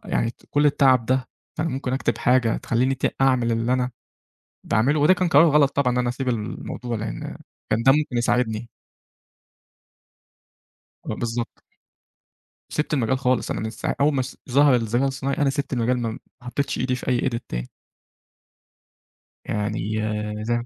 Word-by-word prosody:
يعني 115 0 -1 0.2
كل 145 +1 +3
التعب 130 -5 +4
ده 130 0 0 0.3
فأنا 160 +1 0
ممكن 130 -1 -3
أكتب 135 - -1
حاجة 125 -2 +3
تخلّيني 125 +3 0
ت 130 - -1
أعمل 130 -3 +3
اللي 115 +2 0
أنا 130 0 0 0.7
باعمله. 135 +9 +2
وده 150 +6 +6
كان 185 -1 0
قرار 150 +1 +7
غلط 145 -2 +4
طبعًا 130 -3 +2
إن 125 - 0
أنا 125 - +1
أسيب 130 +2 -3
الموضوع 115 +1 -3
لإن - - -5 0.3
كان 115 - +1
ده 135 +2 +6
ممكن 150 -4 0
يساعدني. 120 -1 0 2.4
آه 110 - -3
بالضبط. 115 0 -4 1.1
سِبت 150 0 -2
المَجال 130 -1 +1
خالص. 130 -2 +1
أنا - - -2
من 110 - -3
س 110 - -9
أول 145 +2 +2
ما 135 - +1
س 125 - -7
ظهر 140 +1 +5
الذكاء 120 +2 0
الاصطناعي، 135 +2 -1
أنا 145 -2 +2
سِبت 140 0 -2
المجال 125 +1 +1
م - - -4
ما - - -8 0.2
حطّيتش 125 +3 -2
إيدي 125 0 0
في - - -8
أي 125 -2 +2
edit 115 - -3
تاني. - - -4 1.8
يعني 105 +1 -2 0.4
ز 115 - -3
125 Hz, 160 wpm, -23 LUFS, 115-135 Hz, 2.4 s, قرار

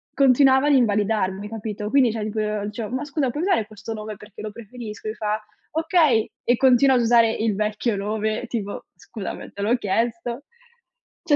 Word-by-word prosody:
continuava 265 +1 +5
ad 290 - +4
invalidarmi, 210 -4 +1
capito? 210 -1 -5
Quindi, 260 -5 +4
cioè 220 -1 -3
tipo 215 +1 -3 0.3
dicevo: 210 +1 -5
"Ma 280 - -2
scusa, 285 -3 -1
puoi 295 +7 -3
usare 365 - +1
questo 215 +1 -7
nome 215 0 -6
perché 210 0 -12
lo 215 -1 -5
preferisco?" 220 -1 -9
Mi - - -3
fa: 215 0 -1 0.3
"Okay". 320 -8 +2
E 245 0 +2
continua 265 0 +5
ad 245 - +3
usare 230 -1 +5
il 220 -1 0
vecchio 215 +1 -1
nome, 215 +3 -2
tipo: 205 -4 -4
"Scusami, 205 -4 -7
te 200 - -7
l'ho 230 +4 +3
chiesto, 235 +4 -2 0.8
cioè" 305 -4 +3
225 Hz, 175 wpm, -23 LUFS, 210-255 Hz, 0.8 s, continuava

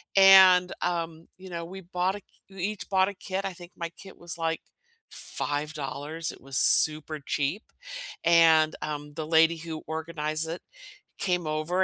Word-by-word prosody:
and, 190 -2 +7
um, 165 -2 -3
you 190 - -11
know, 170 -1 -5
we 190 +3 -9
bought 180 +2 -2
a 205 - -9
ki - - -48 0.2
we 190 -2 -8
each 210 0 -3
bought 190 0 +3
a 200 - -7
kit. 190 0 -5
I 195 - -3
think 175 0 -13
my 170 -1 -5
kit 190 -2 -13
was 170 -1 -8
like 165 -1 -2 0.5
$5, 150 +1 -4
it - - -14
was 135 0 -4
super 155 0 +5
cheap, 145 +9 -2 0.6
and, 165 -2 +5
um, 150 -1 -5
the 155 0 -5
lady 165 +1 +4
who 160 -1 -7
organized 160 0 -3
it 170 - -5 0.6
came 180 -3 -1
over, 155 +5 0
165 Hz, 165 wpm, -27 LUFS, 155-185 Hz, 0.6 s, and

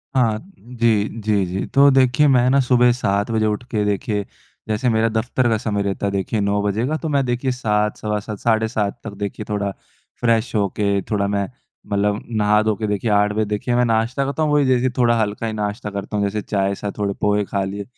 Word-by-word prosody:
हाँ, 115 -4 +3 0.2
जी, 115 -3 +1
जी, 105 -2 +1
जी। 90 +2 -3
तो 140 0 +7
देखिए, 130 +2 +4
मैं 125 -2 +4
ना 135 +2 +4
सुबह 125 -1 +4
7 100 -2 0
बजे 110 -1 +1
उठ 105 +2 -1
के 105 -3 +1
देखिए, 105 0 -1 0.4
जैसे 110 +3 0
मेरा 115 0 +2
दफ़्तर 120 +3 0
का 110 - +2
समय 105 -2 -2
रहता 100 0 -2
है 100 - 0
देखिए, 100 +3 -1
9 100 0 +1
बजे 105 +3 0
का, 155 +2 -1
तो 160 - -4
मैं 140 -2 +2
देखिए, 125 +2 -1
7, 105 -4 0
सवा 105 -1 -2
7, 105 0 -7
साढ़े 110 -1 +2
7 110 -1 -2
तक 105 - -7
देखिए, 100 +1 -4
थोड़ा 100 -1 -1 0.5
फ़्रेश 115 0 +1
हो 100 -2 +2
के, 100 -1 +1
थोड़ा 100 -2 +1
मैं 100 -1 -1 0.4
मतलब 100 +1 +1
नहा-धो 105 -1 +2
के 110 +1 -3
देखिए, 105 +2 -1
8 105 0 +3
बजे 110 +1 0
देखिए, 105 +4 -2
मैं 125 0 +3
नाश्ता 115 +4 0
करता 140 +3 -1
हूँ। 150 -1 +1
वही 145 -1 +4
जैसे 130 0 +2
थोड़ा 120 -2 +3
हल्का 105 +1 -1
ही 110 - -3
नाश्ता 105 +1 -3
करता 100 +1 -4
हूँ। 100 - +1
जैसे 105 +1 -2
चाय 100 -1 -1
साथ 100 +1 -4
थोड़े 100 -1 -1
पोहे 105 0 +2
खा 100 0 -2
लिए। 100 +1 -4
110 Hz, 225 wpm, -20 LUFS, 105-120 Hz, 0.5 s, तो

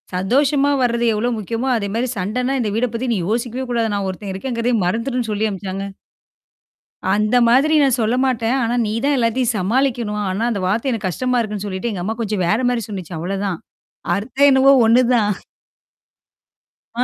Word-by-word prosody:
சந்தோஷமா 275 +9 +2
வர்றது 235 -1 +1
எவ்வளோ 215 +3 0
முக்கியமோ, 230 +5 -3
அதே 200 -2 -3
மாரி 245 +3 0
சண்டன்னா 245 +8 -1
இந்த 225 -4 0
வீட 230 +3 +1
பத்தி 240 +3 -3
நீ - - 0
யோசிக்கவே 240 +3 -2
கூடாது. 230 -2 0
நான் 200 -1 -2
ஒருத்தன் 195 +1 -6
இருக்கங்கிறதயே 235 +3 -1
மறந்துருன்னு 230 +5 -1
சொல்லி 210 +1 0
அனுப்பச்சாங்க. 195 0 -5 1.3
அந்த 215 +3 +1
மாதிரி 275 +6 +4
நான் 270 -3 +3
சொல்ல 225 +2 +1
மாட்டேன். 240 -1 0
ஆனா, 230 +1 0
நீ 210 - -2
தான் 285 +1 +2
எல்லாத்தையும் 240 0 +1
சமாளிக்கணும். 230 +1 0
ஆனா, 190 +4 -2
அந்த 200 -4 -2
வார்த்தை 225 +8 0
எனக்கு 215 -5 -2
கஷ்டமா 250 +6 0
இருக்குன்னு 210 -3 -3
சொல்லிட்டு, 190 +4 -3
எங்க 185 -4 -4
அம்மா 220 +4 -2
கொஞ்சம் 210 -4 -1
வேற 215 +6 +2
மாரி 240 -2 -1
சொன்னுச்சு, 185 -5 -7
அவ்வளோதான். 195 +1 -2 0.6
அர்த்தம் 260 +8 +2
என்னவோ 270 0 +6
ஒண்ணுதான்! 230 -4 +3 1.6
ஆ. 245 - +2
230 Hz, 165 wpm, -19 LUFS, 205-250 Hz, 1.6 s, என்னவோ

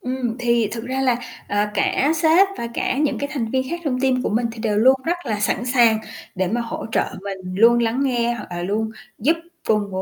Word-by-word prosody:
Ừm, 250 -2 -3
thì 235 -3 +2
thực 225 0 -5
ra 260 +2 -2
là, 255 -3 +2 0.3
ờ, 205 +1 +1
cả 275 +8 +2
sếp 330 +4 +5
và 235 - -3
cả 260 - -1
những 285 -5 +1
cái 285 - -3
thành 230 -6 -2
viên 260 +1 +1
khác 345 0 -3
trong 255 -3 -1
team 255 -1 +2
của - - 0
mình 230 +3 +1
thì 230 - -11
đều 215 -2 0
luôn 255 +5 +6
rất 345 +2 +1
là 215 -5 -2
sẵn 225 +3 0
sàng 240 -3 +4 0.4
để 185 -2 0
mà 235 +5 -1
hỗ 230 -1 -5
trợ - - +2 0.2
mình, 190 -2 -6
luôn 235 +3 +6
lắng 235 +3 +1
nghe 240 -3 +1
hoặc 235 - -7
là 175 0 -4
luôn 215 +4 -1 0.3
giúp 305 +9 +2 0.3
cùng 210 -2 +1
235 Hz, 235 wpm, -21 LUFS, 215-260 Hz, 0.4 s, luôn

